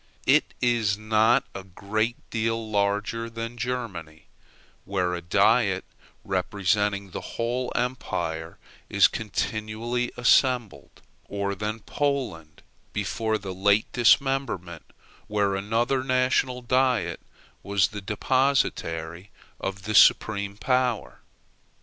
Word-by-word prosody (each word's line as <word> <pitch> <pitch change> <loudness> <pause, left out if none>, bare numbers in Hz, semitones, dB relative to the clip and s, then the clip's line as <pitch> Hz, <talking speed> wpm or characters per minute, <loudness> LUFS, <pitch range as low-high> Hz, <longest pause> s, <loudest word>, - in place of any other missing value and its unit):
It - - +3
is 115 -4 +2
not 110 +4 +3
a 95 - -7
great 110 +5 -2 0.2
deal 115 0 -1
larger 105 +3 0
than 115 +1 -6
Germany, 110 -11 -5 0.6
where 90 -2 -1
a 85 - -3
diet 85 - +2 0.4
representing 100 +1 0
the - - -5 0.2
whole 120 +2 -1
empire 85 -10 -3 0.3
is - - +6
continually 110 +3 -3
assembled; 120 - +1 0.2
or 100 0 -2
than 105 +3 -4
Poland 125 - -3 0.3
before 110 +2 -1
the 95 -2 -6
late 100 +3 +2
dismemberment, 120 - +1 0.4
where 100 -2 +1
another 115 +6 0
national 130 -1 +1
diet 130 0 +1 0.4
was 100 -3 +1
the 105 0 -7
depositary 100 -7 0 0.3
of 95 0 -4
the 110 +1 -3
supreme 100 -1 +4
power. 125 +2 0
110 Hz, 100 wpm, -25 LUFS, 100-120 Hz, 0.6 s, is